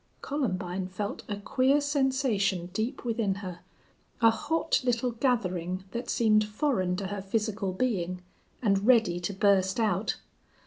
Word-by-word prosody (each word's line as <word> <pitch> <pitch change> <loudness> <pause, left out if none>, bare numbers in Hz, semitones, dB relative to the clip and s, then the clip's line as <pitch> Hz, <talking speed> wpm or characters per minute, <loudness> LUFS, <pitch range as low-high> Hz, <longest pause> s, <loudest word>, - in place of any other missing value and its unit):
Columbine 185 -10 -2
felt 200 +2 -4
a 205 - -1
queer 260 +7 +2
sensation 260 - 0
deep 230 +6 -3
within 225 -4 0
her, 185 -3 -7 0.6
a 225 -1 +6
hot 310 +8 0
little 245 0 +1
gathering 185 -7 -1
that 240 +1 -4
seemed 215 -2 +4
foreign 210 -4 0
to 195 +1 -4
her 200 +1 -4
physical 205 0 -1
being, 185 -4 -1 0.4
and 200 -1 +2
ready 220 -9 +4
to 175 +3 -3
burst 195 0 +2
out. 210 -2 +1
210 Hz, 135 wpm, -28 LUFS, 185-245 Hz, 0.6 s, a